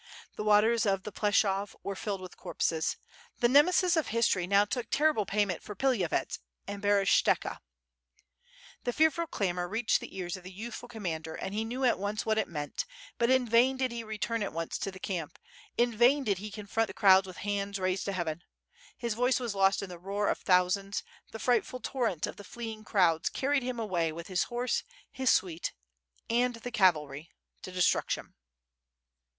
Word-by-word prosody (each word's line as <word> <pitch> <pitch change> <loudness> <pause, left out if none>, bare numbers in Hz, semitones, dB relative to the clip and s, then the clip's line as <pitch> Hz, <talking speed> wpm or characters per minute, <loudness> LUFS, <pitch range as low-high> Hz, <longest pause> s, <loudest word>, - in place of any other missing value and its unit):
The - - -4
waters 215 +2 +4
of 195 -1 +1
the 210 - -6
Pleshov 200 -1 +1
were 200 - -3
filled 200 -1 -3
with 185 -1 -9
corpses. 160 -1 -1 0.4
The 240 - +3
Nemesis 350 +7 +5
of 320 - +1
history 220 -6 +1
now 200 +2 +4
took 245 +3 -3
terrible 295 -8 +2
payment 200 -3 0
for 210 - -8
Pilavyets 225 -8 0 0.3
and 200 0 -6
Berest^ohka. 205 -1 +2 1.2
The 245 - -1
fearful 320 +3 +2
clamor 180 - -1
reached 220 +5 +1
the - - -9
ears 180 0 -3
of 185 - -11
the 185 - -9
youthful 230 +5 -7
com 220 -2 -9
mander, 160 -2 -3
and 195 - -5
he 215 +2 -1
knew 245 +4 -4
at 240 - +3
once 205 +2 -2
what 220 0 +2
it 220 - 0
meant, 150 -3 -4 0.3
but 235 - +3
in 260 -1 +3
vain 245 +4 +4
did 260 -1 0
he 235 -1 -4
return 220 +1 -2
at 200 - -2
once 165 0 -3
to - - -2
the 190 - -9
camp, 175 -6 -4 0.4
in 240 -1 +2
vain 255 +5 +5
did 200 -6 0
he 210 +2 -6
confront 215 +2 -1
the - - -9
crowds 190 -3 +6
with 185 - -9
hands 200 0 -2
raised 185 -1 -1
to 200 - -1
heaven. 170 -3 -3 0.6
His 235 -2 -2
voice 250 +4 +2
was 240 -4 -3
lost 195 0 +3
in 195 - -6
the 175 -1 -9
roar 200 +3 -1
of - - 0
thousands, 190 +2 +2 0.3
the - - -7
frightful 250 +2 +1
torrent 235 - -1
of - - -8
the 205 - -9
fleeing 225 -1 -7
crowds 175 -7 +2
carried 280 +1 0
him 250 -1 -3
away 175 -7 0
with 170 +3 -8
his 185 -2 +1
horse, 245 0 -1 0.3
his 260 -1 0
suite, 175 -3 +1 0.5
and 245 +1 +1
the 240 +2 -7
cavalry, 160 -7 +2 0.3
to 185 - -8
destruction. 180 -1 0
205 Hz, 190 wpm, -30 LUFS, 185-235 Hz, 1.2 s, crowds